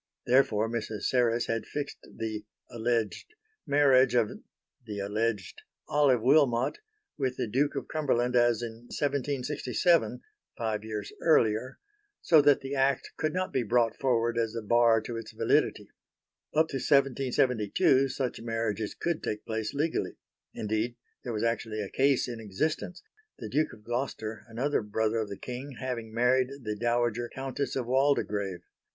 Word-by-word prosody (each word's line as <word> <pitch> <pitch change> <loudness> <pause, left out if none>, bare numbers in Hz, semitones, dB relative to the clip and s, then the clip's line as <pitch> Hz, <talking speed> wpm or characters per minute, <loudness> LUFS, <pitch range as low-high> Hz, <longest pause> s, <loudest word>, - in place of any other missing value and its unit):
Therefore 120 -4 +3
Mrs. 110 -3 -4
Serres 120 -2 +2
had 115 -1 -2
fixed 145 -1 -5
the 110 -1 -4 0.3
(alleged) 115 - -2 0.3
marriage 135 -3 +5
of 115 -3 +3 0.5
(the 105 -3 -6
alleged) 105 -2 -2 0.3
Olive 135 -6 +3
Wilmot 130 -2 +3 0.4
with 130 -2 -1
the 125 - 0
Duke 135 +7 0
of 135 - -4
Cumberland 125 -5 0
as 120 -1 +3
in 115 +1 -8
1767 145 +3 0 0.4
five 110 -3 -2
years 105 -2 -5
earlier 125 -5 +2 0.4
so 160 -3 +5
that 145 -1 +4
the 135 +1 -5
Act 135 -1 +1
could 155 0 -1
not 185 +2 -2
be 130 - +2
brought 115 0 +2
forward 120 -3 +1
as 115 -1 -1
a 115 - -3
bar 115 0 +4
to 115 +1 -5
its 115 -1 -8
validity. - - +1 0.7
Up 160 +1 +4
to 135 - -2
1772 130 -2 +2
such 130 -3 -3
marriages 115 -2 -2
could 170 -2 -2
take 105 0 -4
place 110 -1 -2
legally. 155 +3 -1 0.4
Indeed 110 +3 -1 0.3
there 125 - -4
was 110 -1 -2
actually 115 -1 -1
a 100 -3 -4
case 135 -1 +2
in 120 -2 -5
existence 155 - -3 0.3
the - - -7
Duke 155 +1 +1
of 105 - -14
Gloucester 120 -2 -4
(another 125 +6 0
brother 110 +1 -1
of 110 -2 -3
the 100 - -6
King) 130 +3 -7
having 120 -4 -4
married 125 +3 +2
the 105 -1 -3
dowager 120 +1 0
Countess 135 +1 -3
of 130 -3 -1
Waldegrave. 105 -8 +1
120 Hz, 150 wpm, -29 LUFS, 110-135 Hz, 0.7 s, marriage